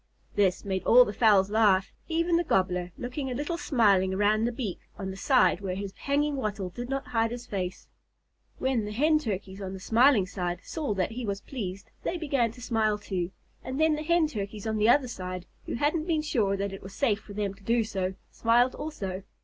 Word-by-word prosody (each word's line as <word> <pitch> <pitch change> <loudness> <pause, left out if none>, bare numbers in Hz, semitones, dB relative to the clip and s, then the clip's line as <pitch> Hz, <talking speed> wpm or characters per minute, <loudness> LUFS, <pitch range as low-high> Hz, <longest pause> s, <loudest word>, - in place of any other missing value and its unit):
This 190 -2 +1
made 190 -1 -2
all 250 +1 +8
the 205 - -4
fowls 205 -3 +4
laugh, 205 -3 +3 0.2
even 335 +1 +1
the 340 - +3
Gobbler 180 - 0
looking 255 +3 -4
a 250 - -3
little 295 +5 -2
smiling 195 -7 +3
around 210 +2 +3
the 240 - 0
beak 225 -6 -4 0.2
on 190 -1 -4
the - - -7
side 255 +1 +3
where 185 -2 -3
his 195 0 -5
hanging 285 +1 0
wattle 205 -6 -2
did 245 +6 -6
not 270 0 -3
hide 225 -1 +1
his 240 +1 -6
face. 185 -5 -4 0.7
When 260 -5 0
the 210 - -5
Hen 305 +6 +3
Turkeys 200 -6 -4
on 190 -1 -5
the 190 - -7
smiling 230 +1 +4
side 180 -2 -3
saw 295 -10 -3
that 190 +2 0
he 245 +2 -5
was 200 -2 -3
pleased, 200 -6 -6
they 350 - -2
began 275 -8 +1
to 245 - -13
smile 220 -3 +1
too; 185 -4 -3 0.3
and 260 +2 -4
then 315 0 +4
the 300 - -4
Hen 340 +1 +3
Turkeys 210 -6 -5
on 220 -1 -1
the 215 +2 +3
other 260 +1 +5
side, 185 -5 -6 0.2
who - - -2
hadn't 310 +6 0
been 315 -3 +1
sure 210 -10 +1
that 200 0 -2
it 195 - -8
was 190 +1 -10
safe 225 -7 +1
for 205 - -12
them 200 -1 -2
to 200 - -20
do 230 +3 +2
so, 190 -3 -3 0.2
smiled 240 +2 +3
also. 195 -12 -5
215 Hz, 215 wpm, -28 LUFS, 195-265 Hz, 0.7 s, all